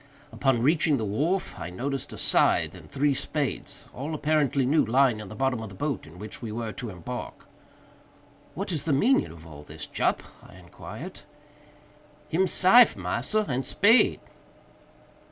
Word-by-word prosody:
Upon 130 -4 +1
reaching 155 0 +3
the 110 - -2
wharf, 155 - -1
I - - -5
noticed 135 +9 -4
a - - -8
scythe - - +3
and - - -13
three 140 +1 +1
spades, 140 0 -3
all 150 +5 -4
apparently 145 -3 +1
new, 150 +5 +3
lying 125 0 +3
in 105 - -8
the 110 - -9
bottom 130 0 0
of 110 - -7
the 95 - -12
boat 140 0 -3
in 85 - -14
which 105 +3 -8
we 115 -3 -5
were 115 0 -4
to 120 +2 -6
embark. 95 +6 -7 1.1
"What 195 +2 -4
is 160 -5 -1
the 160 - +1
meaning 250 - +3
of 80 -1 -13
all 75 -3 -11
this, 75 +1 -7
Jup?" - - -1 0.2
I - - -16
inquired. - - -10 1.1
"Him 185 +5 +2
syfe, 225 +7 +6
massa, 120 - -1
and 130 -1 -1
spade." 205 - +4
135 Hz, 165 wpm, -26 LUFS, 110-155 Hz, 1.1 s, syfe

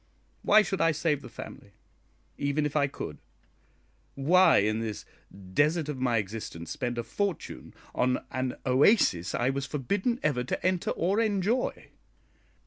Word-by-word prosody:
Why 215 +1 +6
should 195 -1 -2
I 165 - +4
save 150 -2 0
the - - -10
family, - - -10 0.6
even 145 +1 0
if 150 - -3
I 140 -2 +3
could? - - -7 1.0
Why 175 +7 +5
in 110 +2 +2
this 110 -2 -5 0.5
desert 150 - +2
of 140 -3 -4
my 125 -2 +1
existence 100 -5 -5
spend 120 -1 -3
a 120 - -1
fortune 195 - -4 0.2
on 125 +1 0
an 130 -1 -2
oasis 130 - +3
I 125 +2 +1
was 140 0 -3
forbidden 200 - -1
ever 140 -5 +1
to 125 - -4
enter 185 -1 +1
or 190 +6 0
enjoy? 215 +2 0
145 Hz, 145 wpm, -28 LUFS, 125-185 Hz, 1.0 s, Why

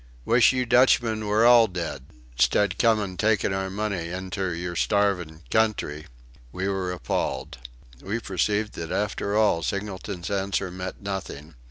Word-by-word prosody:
Wish 120 0 +5
you 130 -1 0
Dutchmen 120 -3 +3
were 105 +3 +3
all 120 -2 +7
dead 85 -8 -5 0.3
'stead 105 +10 +2
comin' 105 -5 +2
takin' 105 +1 +1
our 95 0 -2
money 100 -4 -3
inter 95 +1 -3
your 85 +1 -4
starvin' 90 -5 0
country." 105 -9 0 0.4
We 95 +6 -3
were 95 -2 -1
appalled. 65 -7 -3 0.4
We 105 +4 -3
perceived 105 +1 -1
that 80 - -6
after 105 0 -1
all 105 -6 +3
Singleton's 100 -1 -4
answer 100 -1 -1
meant 90 +2 -7
nothing. 85 -6 -6
100 Hz, 140 wpm, -25 LUFS, 90-105 Hz, 0.4 s, all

